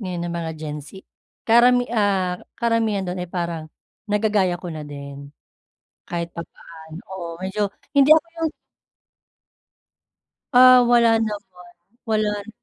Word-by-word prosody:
ngayon 180 Hz, -4 st, -4 dB
ng 170 Hz, -, -4 dB
mga 165 Hz, -1 st, -3 dB
Gen 150 Hz, -1 st, -5 dB
Z, -, -, -13 dB, 0.6 s
karami 245 Hz, +2 st, +5 dB
ah, 195 Hz, -5 st, +1 dB, 0.2 s
karamihan 225 Hz, -4 st, 0 dB
dun 180 Hz, 0 st, -4 dB
ay 180 Hz, -, -5 dB
parang, 170 Hz, -3 st, -3 dB, 0.4 s
nagagaya 205 Hz, -3 st, +1 dB
ko 180 Hz, -, -7 dB
na 155 Hz, -1 st, -6 dB
din. 140 Hz, -1 st, -9 dB, 0.8 s
Kahit 170 Hz, -1 st, -4 dB
papaano 160 Hz, -1 st, -11 dB, 0.2 s
oo 175 Hz, -3 st, -6 dB
medyo 195 Hz, +2 st, -2 dB, 0.2 s
hindi 280 Hz, +1 st, +5 dB
ako 315 Hz, +2 st, +6 dB, 0.2 s
yung 320 Hz, -1 st, 0 dB, 2.0 s
Ah, 255 Hz, 0 st, +9 dB
wala 235 Hz, -1 st, +4 dB
naman, 215 Hz, -2 st, -2 dB, 0.6 s
wala 215 Hz, -1 st, +1 dB, 0.2 s
n -, -, -17 dB
190 Hz, 130 wpm, -22 LUFS, 170-225 Hz, 2.0 s, Ah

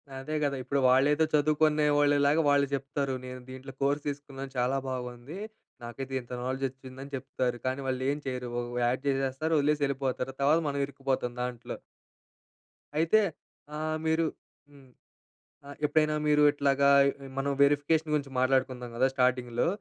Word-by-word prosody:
అదే 135 Hz, +4 st, -5 dB
కదా! 140 Hz, -1 st, 0 dB
ఇప్పుడు 140 Hz, +2 st, 0 dB
వాళ్ళేదో 145 Hz, +4 st, +4 dB
చదువుకునే 150 Hz, 0 st, +3 dB
వాళ్ళలాగా 145 Hz, +1 st, +4 dB
వాళ్ళు 140 Hz, -1 st, +4 dB
చెప్తారు. 140 Hz, 0 st, -2 dB
"నేను 125 Hz, 0 st, -7 dB
దీంట్లో 130 Hz, +1 st, -9 dB
కోర్స్ 145 Hz, +1 st, +1 dB
తీసుకున్నాను. 140 Hz, -1 st, -6 dB
చాలా 125 Hz, +2 st, +1 dB
బాగుంది 125 Hz, +5 st, -6 dB, 0.5 s
నాకైతే 135 Hz, +3 st, -6 dB
ఇంత 120 Hz, -, -17 dB
నాలెడ్జ్ 130 Hz, +2 st, -2 dB
వచ్చింది" 130 Hz, 0 st, -12 dB
అని 140 Hz, -, -12 dB
చెప్తారు. 130 Hz, -2 st, -2 dB
కానీ 130 Hz, +2 st, -1 dB
వాళ్ళేం 130 Hz, +3 st, -1 dB
చేయరు. 125 Hz, -2 st, -3 dB
ఒక 120 Hz, -, -6 dB, 0.2 s
యాడ్ 130 Hz, +3 st, 0 dB
చేసేస్తారు. 135 Hz, +4 st, 0 dB
వదిలేసి 150 Hz, 0 st, +1 dB
యెళ్ళిపోతారు. 135 Hz, -1 st, -2 dB
తర్వాత 150 Hz, +4 st, +4 dB
మనం 140 Hz, 0 st, -2 dB
ఇరుక్కుపోతాం 135 Hz, -3 st, -2 dB
దాంట్లో. 125 Hz, -1 st, -5 dB, 1.2 s
అయితే 165 Hz, +8 st, +4 dB, 0.5 s
ఆహ్, 155 Hz, +1 st, -2 dB
మీరు 160 Hz, +1 st, +2 dB, 0.5 s
హ్మ్. 135 Hz, -2 st, -18 dB, 0.8 s
ఆహ్, 145 Hz, -, -9 dB
ఎప్పుడైనా 155 Hz, 0 st, +2 dB
మీరు 150 Hz, 0 st, +4 dB
ఇట్లాగా 140 Hz, -1 st, +2 dB, 0.5 s
మనం 140 Hz, +1 st, 0 dB
వెరిఫికేషన్ 145 Hz, +2 st, +2 dB
గురించి 140 Hz, -2 st, -1 dB
మాట్లాడుకుందాం 130 Hz, -1 st, +1 dB
కదా! 130 Hz, +2 st, +4 dB
స్టార్టింగ్‌లో. 125 Hz, -2 st, +1 dB
135 Hz, 140 wpm, -29 LUFS, 130-145 Hz, 1.2 s, వాళ్ళేదో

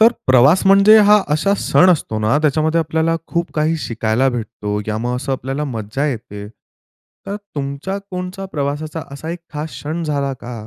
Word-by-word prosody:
तर 225 Hz, +2 st, +7 dB
प्रवास 130 Hz, +9 st, +5 dB
म्हणजे 195 Hz, +3 st, +7 dB
हा 210 Hz, 0 st, +7 dB
असा 185 Hz, +7 st, +2 dB
सण 185 Hz, +1 st, +4 dB
असतो 140 Hz, -10 st, 0 dB
ना, 110 Hz, +7 st, +2 dB
त्याच्यामध्ये 155 Hz, +2 st, +2 dB
आपल्याला 160 Hz, +1 st, 0 dB
खूप 170 Hz, 0 st, -2 dB
काही 155 Hz, +1 st, +1 dB
शिकायला 115 Hz, 0 st, 0 dB
भेटतो, 110 Hz, -4 st, -4 dB
या 110 Hz, 0 st, -1 dB
मग 120 Hz, +2 st, -2 dB
असां 135 Hz, +2 st, -3 dB
आपल्याला 135 Hz, +3 st, -3 dB
मज्जा 120 Hz, +1 st, -3 dB
येते. 105 Hz, -6 st, -5 dB, 0.8 s
तर 200 Hz, -, -3 dB, 0.2 s
तुमच्या 140 Hz, +7 st, -4 dB
कोणत्या 180 Hz, +1 st, -5 dB
प्रवासाचा 150 Hz, +2 st, -3 dB
असा 155 Hz, +3 st, -6 dB
एक 175 Hz, -, -5 dB
खास 150 Hz, +1 st, -4 dB
क्षण 160 Hz, +4 st, -5 dB
झाला 140 Hz, -3 st, -1 dB
का? 125 Hz, -, -8 dB
150 Hz, 170 wpm, -18 LUFS, 125-170 Hz, 0.8 s, तर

